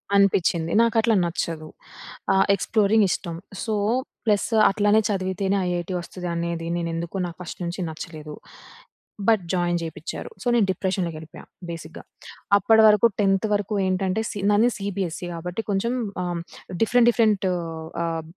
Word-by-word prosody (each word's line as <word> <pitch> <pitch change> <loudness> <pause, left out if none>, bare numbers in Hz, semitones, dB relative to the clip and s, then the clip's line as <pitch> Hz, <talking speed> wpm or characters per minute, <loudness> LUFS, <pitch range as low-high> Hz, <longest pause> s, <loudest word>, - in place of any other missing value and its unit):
అనిపించింది. 175 -4 +3
నాకు 230 0 +2
అట్లా 225 0 +2
నచ్చదు. 165 -2 -3 0.7
ఆహ్, 195 0 +4
ఎక్స్‌ప్లోరింగ్ 210 +1 +3
ఇష్టం. 170 -1 -3 0.3
సో, 220 -2 -1 0.5
ప్లసు, 215 +1 +1
అట్లనే 205 +2 +3
చదివితేనే 190 0 0
ఐఐటీ 175 +1 -2
వస్తదనేది 170 -1 -4
నేనెందుకొ 170 +2 -3
నాకు 170 - -10
ఫస్ట్ 175 - -8
నుంచి 170 +3 -4
నచ్చలేదు. 155 -1 -8 0.9
But, 220 -5 +4
join 175 -1 +1
చేపిచారు. 160 0 -6
సో, - - -4
నేను 225 - +4
డిప్రెషన్‌లోకేళ్ళిపోయా. 170 -4 -4 0.2
బేసిక్‌గా, 165 -1 -8 0.5
అప్పటివరకు 215 +1 +6
10థ్ 195 +1 +2
వరకు 205 +1 -1
ఏంటంటే, 185 +2 0
సి 205 - -6
నాది 215 +4 +4
సీబీఎస్ఈ 190 -4 -3
కాబట్టి, 180 +6 -4
కొంచెం 215 +5 0 0.3
ఆహ్, 175 - -2
హ్మ్, 170 - -3 0.4
డిఫరెంట్ 240 +1 +4
డిఫరెంటు 210 -5 +2 0.5
ఆహ్, 165 -1 -2
190 Hz, 125 wpm, -24 LUFS, 170-210 Hz, 0.9 s, అప్పటివరకు